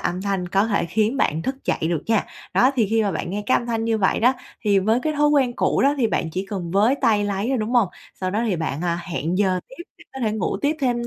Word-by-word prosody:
âm 180 +2 -2
thanh 195 -3 -2
có 195 +3 +2
thể 205 -5 0
khiến 220 +7 0
bạn 160 - 0
thức 265 +5 -4
dậy - - 0
được 160 -1 -1
nha. 225 -2 +2 0.3
Đó, 255 - +5
thì 225 -5 +2
khi 225 0 +3
mà 205 - 0
bạn 175 - -4
nghe 205 +1 -3
cái - - +4
âm 240 - -7
thanh 225 -1 -1
như 225 -1 +1
vậy 190 - +1
đó, 250 +3 +5 0.3
thì 200 -2 +4
với 220 +5 +2
cái 310 - 0
thói 295 0 +2
quen 275 -4 +3
cũ - - +1
đó 280 +1 +4
thì 235 - +3
bạn 165 -6 -1
chỉ 185 +3 -4
cần 180 -5 -4
với 210 +8 +3
tay 210 -2 +3
lấy 200 +3 -2
thôi, 265 -2 +1
đúng 215 +2 -2
hông? 230 -6 +4 0.3
Sau 185 0 -1
đó 215 +4 0
thì 190 -5 0
bạn, 160 -1 -3
à, 170 -1 0
hẹn 170 +2 -1
giờ 185 -3 +2
tiếp, 345 +6 -10 0.3
có 265 - -6
thể 215 -3 0
ngủ 200 -2 -1
tiếp 300 +2 +1
thêm 240 -2 0
215 Hz, 280 wpm, -22 LUFS, 185-240 Hz, 0.3 s, Đó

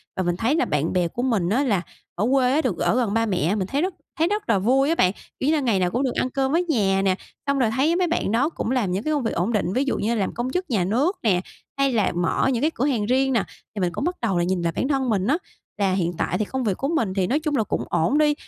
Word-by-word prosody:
và 190 - -1
mình 175 -1 0
thấy 230 - +1
là - - +2
bạn 150 +4 -1
bè 180 -2 +2
của 240 +8 -5
mình 215 -9 +1
á, 255 +7 +2
là 205 -10 +1 0.3
ở 200 - 0
quê 255 -2 +3
á, 310 - +3
được 235 - -1
ở - - +1
gần 235 -5 +1
ba 225 +1 +2
mẹ 185 -2 0
mình 190 -3 -2
thấy 280 +6 -1
rất 370 0 -1 0.3
thấy 330 - +3
rất 415 - -2
là 200 -4 +3
vui 265 +7 +3
á 330 - +2
bạn. 185 - +3 0.3
Kiểu 265 - -1
như - - +3
là, - - +1
ngày 230 -7 +1
nào 180 -1 +1
cũng 250 +6 0
được 255 - 0
ăn 255 - 0
cơm 265 +1 -1
với 335 +4 +2
nhà 205 - +1
nè, 190 -1 +2 0.3
xong 280 -1 +1
rồi 235 - +3
thấy 300 +6 +2
mấy 360 0 +1
bạn 330 -11 -1
đó 265 +7 +2
cũng 250 - -3
làm 235 -8 0
những 190 +4 -2
cái 310 - 0
công 290 -3 0
việc 225 - -1
ổn 190 +7 0
định, 190 -3 0
ví 260 - +1
dụ 270 - 0
như 230 +3 0
làm 200 -3 -1
công 240 +2 -3
chức 360 +1 -2
nhà 210 -8 +1
nước 275 - +1
nè, 190 -6 +3 0.4
hay 275 -2 +2
là 215 -4 +2
mở 175 +9 +1
những 235 - -1
cái 310 +2 +2
cửa 260 - 0
hàng 240 -8 0
riêng 265 +3 +2
nè. 230 -5 +2 0.3
Thì - - -3
mình 175 - +1
cũng - - -3
bắt 355 +3 -1
đầu 195 -7 +1
nhìn 180 +1 0
lại 170 -1 -1
bản 260 - 0
thân 270 -3 0
mình 200 -2 +1
á, 300 +5 +3 0.4
là 195 -2 +1
hiện 175 -2 0
tại 180 - -1
thì 215 - -1
công 260 +4 -3
việc 200 -5 0
của 275 - -2
mình 230 - 0
thì 190 -2 0
nói 285 - +1
chung 305 -2 -2
là 225 - +2
cũng - - -2
ổn 235 - +1
đi, 300 -1 +4
235 Hz, 315 wpm, -23 LUFS, 190-275 Hz, 0.4 s, đi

